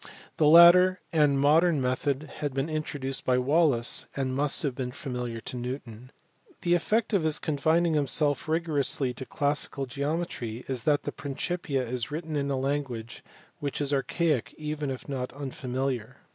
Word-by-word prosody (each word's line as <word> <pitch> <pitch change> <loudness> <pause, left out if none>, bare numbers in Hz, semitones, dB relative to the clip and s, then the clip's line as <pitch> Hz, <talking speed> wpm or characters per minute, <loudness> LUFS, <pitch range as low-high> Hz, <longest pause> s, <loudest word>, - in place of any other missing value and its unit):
The 150 - +4
latter 175 +3 +8
and 145 -3 +3
modern 155 +3 +4
method 130 +2 -1
had 145 -3 -3
been 135 +3 -1
introduced 145 -3 -3
by 125 -1 +2
Wallis, 135 -2 +2
and 130 -1 -2
must 145 +4 +2
have 140 -4 0
been 125 -1 -4
familiar 125 -3 -5
to 125 - -6
Newton. 125 -1 -7 0.5
The 175 -1 +2
effect 215 +6 +1
of 195 - +3
his 155 -1 +2
confining 160 +3 +1
himself 145 0 +1
rigorously 145 -5 0
to 130 +2 -9
classical 145 -1 -1
geometry 140 -4 -4
is 130 -2 -3
that 150 -2 +2
the - - -3
Principia 140 -2 -3
is 120 0 -3
written 155 +1 -4
in 140 -1 -1
a 135 - 0
language 130 -4 -3 0.4
which 140 -1 -3
is 145 -1 0
archaic, 145 -1 0
even 150 -1 -3
if 130 -1 -6
not 130 -3 -4
unfamiliar. 130 -2 -4
140 Hz, 160 wpm, -27 LUFS, 130-155 Hz, 0.5 s, latter